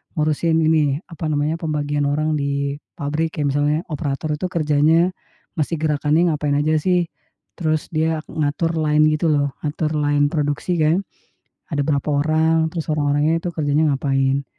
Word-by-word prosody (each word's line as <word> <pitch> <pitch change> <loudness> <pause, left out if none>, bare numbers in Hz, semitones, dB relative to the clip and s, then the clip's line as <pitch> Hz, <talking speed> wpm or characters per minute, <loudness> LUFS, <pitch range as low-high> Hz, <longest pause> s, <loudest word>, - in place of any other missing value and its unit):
ngurusin 155 +1 +1
ini, 155 -3 +2
apa 160 -1 -4
namanya, 150 +1 0
pembagian 145 -2 -1
orang 155 +2 0
di 140 0 -1 0.2
pabrik 155 +2 -2
kayak 145 -2 0
misalnya 150 +1 +2
operator 150 0 -2
itu 165 +5 -3
kerjanya 160 +3 +3 0.5
mesti 155 +3 0
gerakannya 155 +2 +2
ngapain 145 -1 -1
aja 155 +1 +1
sih, 180 -1 +2 0.5
terus 155 -3 -1
dia 160 0 +1
ngatur 160 +1 -1
line 155 0 +3
gitu 165 +2 0
loh, 145 -2 +1
ngatur 155 +1 -2
line 145 -1 +2
produksi 150 +3 -1
kan, 160 +5 +3 0.7
ada 145 - 0
berapa 145 -1 0
orang, 160 +2 +2
terus 165 -2 -4
orang-orangnya 150 +2 +1
itu - - -2
kerjanya 150 0 +1
ngapain. 135 0 0
150 Hz, 150 wpm, -21 LUFS, 145-160 Hz, 0.7 s, kerjanya